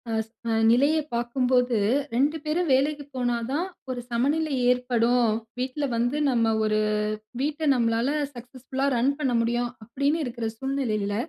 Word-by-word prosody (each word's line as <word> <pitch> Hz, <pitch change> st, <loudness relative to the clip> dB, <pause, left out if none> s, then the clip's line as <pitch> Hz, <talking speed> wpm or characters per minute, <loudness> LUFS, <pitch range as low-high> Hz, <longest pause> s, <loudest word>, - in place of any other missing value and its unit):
As 220 Hz, 0 st, -2 dB, 0.2 s
a -, -, +1 dB, 0.2 s
நிலையை 285 Hz, +6 st, +4 dB
பார்க்கும்போது 250 Hz, 0 st, +1 dB, 0.4 s
2 290 Hz, +6 st, +2 dB
பேரும் 315 Hz, +1 st, 0 dB
வேலைக்கு 290 Hz, +2 st, +1 dB
போனா 245 Hz, -2 st, 0 dB
தான் 300 Hz, +6 st, 0 dB, 0.2 s
ஒரு 250 Hz, -1 st, -3 dB
சமநிலை 285 Hz, +5 st, +1 dB, 0.2 s
ஏற்படும். 245 Hz, -1 st, +2 dB, 0.3 s
வீட்ல 260 Hz, +3 st, -2 dB
வந்து 245 Hz, +5 st, 0 dB
நம்ம 230 Hz, -3 st, +2 dB
ஒரு 215 Hz, 0 st, +1 dB, 0.6 s
வீட்ட 295 Hz, +2 st, -2 dB
நம்மளால 230 Hz, +1 st, +1 dB, 0.2 s
சக்சஸ்ஃபுல்லா 255 Hz, +2 st, -4 dB
ரன் 265 Hz, +4 st, +2 dB
பண்ண 260 Hz, -4 st, +1 dB
முடியும். 240 Hz, +1 st, 0 dB
அப்படின்னு 280 Hz, +7 st, 0 dB
இருக்கிற 235 Hz, -3 st, -3 dB
சூழ்நிலையில, 225 Hz, -7 st, -1 dB
250 Hz, 135 wpm, -25 LUFS, 235-280 Hz, 0.6 s, நிலையை